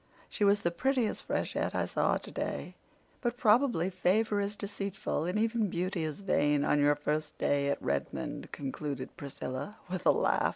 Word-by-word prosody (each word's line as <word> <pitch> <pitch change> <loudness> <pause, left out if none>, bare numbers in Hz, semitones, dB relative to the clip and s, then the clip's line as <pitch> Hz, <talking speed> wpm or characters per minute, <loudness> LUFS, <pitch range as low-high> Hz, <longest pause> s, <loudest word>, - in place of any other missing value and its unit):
She - - -1
was 200 0 +5
the 170 - +1
prettiest 250 +4 0
freshette - - -1
I - - +1
saw - - +1
today, - - -4 0.5
but 240 -1 -1
probably 220 -6 +3
favor 205 +4 +2
is 200 +1 -2
deceitful 200 -5 -3
and 180 +4 -1
even 220 -1 +1
beauty 175 0 -1
is 155 +4 -4
vain 145 -6 +2
on 150 - +3
your 145 0 +5
first 150 +1 -2
day 140 0 +1
at 140 - 0
Redmond," 70 0 -3
concluded 140 -1 -4
Priscilla 140 +7 -5
with 185 -2 -2
a - - +9
laugh. - - +2
185 Hz, 165 wpm, -31 LUFS, 145-210 Hz, 0.5 s, a